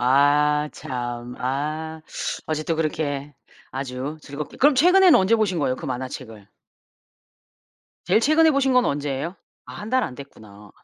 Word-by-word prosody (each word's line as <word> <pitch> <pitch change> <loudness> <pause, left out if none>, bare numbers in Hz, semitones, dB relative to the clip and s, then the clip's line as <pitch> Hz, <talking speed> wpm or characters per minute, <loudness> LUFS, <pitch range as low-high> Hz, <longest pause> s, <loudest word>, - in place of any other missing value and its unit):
아 145 +3 +3
참 120 -1 -5
아. 155 +5 -3 0.5
아직도 155 +1 -2
그렇게 150 -3 -2 0.4
아주 135 +3 -5
즐겁게 145 +1 -7
그럼 290 +1 +4
최근에는 360 +4 +6
언제 190 +5 +3
보신 195 -6 0
거예요 130 -3 +1
그 - - -9
만화책을? 125 -5 -6 1.6
제일 195 +5 +3
최근에 310 +5 +4
보신 275 -2 +2
건 250 -1 +4
언제예요? 145 +4 -2 0.3
아 - - -10
1 210 +3 -7
달 255 -1 +3
안 125 - -4
됐구나. 105 -7 -13
150 Hz, 275 characters per minute, -23 LUFS, 130-190 Hz, 1.6 s, 최근에는